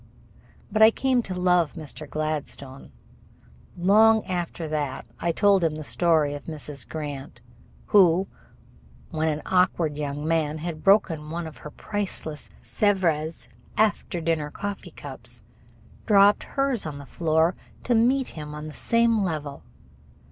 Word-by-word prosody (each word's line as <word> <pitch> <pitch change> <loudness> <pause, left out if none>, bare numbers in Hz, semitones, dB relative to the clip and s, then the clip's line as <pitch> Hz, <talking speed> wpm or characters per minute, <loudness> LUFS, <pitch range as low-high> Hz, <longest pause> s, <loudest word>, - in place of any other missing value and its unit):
But 215 +1 0
I 220 - +10
came 255 +1 +1
to 190 -5 -5
love 180 -3 +3
Mr. 150 0 -8
Gladstone. 150 -3 -4 0.9
Long 215 +4 +5
after 175 -2 -3
that 150 -3 -3
I 170 - 0
told 195 +2 +3
him 160 -2 +1
the 155 - -6
story 155 -2 +2
of 145 - -8
Mrs. 145 -6 -7
Grant, 145 -6 -6 0.5
who, 190 -2 +4 0.8
when 160 -1 0
an 155 -1 -1
awkward 175 -5 +1
young 145 +1 -3
man 160 -2 +1
had 160 0 -6
broken 170 -7 +3
one 170 +1 -4
of 160 -2 -9
her 150 - -8
priceless 190 -5 -5
Sevres 170 -7 0 0.3
after 210 -4 +1
dinner 160 -2 -1
coffee 200 +5 -6
cups, - - -10 0.6
dropped 205 -1 +5
hers 275 - -1
on 145 -2 -6
the 140 - -9
floor 160 +4 +1 0.3
to 245 - +1
meet 250 +3 +3
him 150 -1 -8
on 150 0 -7
the 155 - -8
same 230 +3 +2
level. 155 -7 -3
165 Hz, 140 wpm, -25 LUFS, 150-200 Hz, 0.9 s, I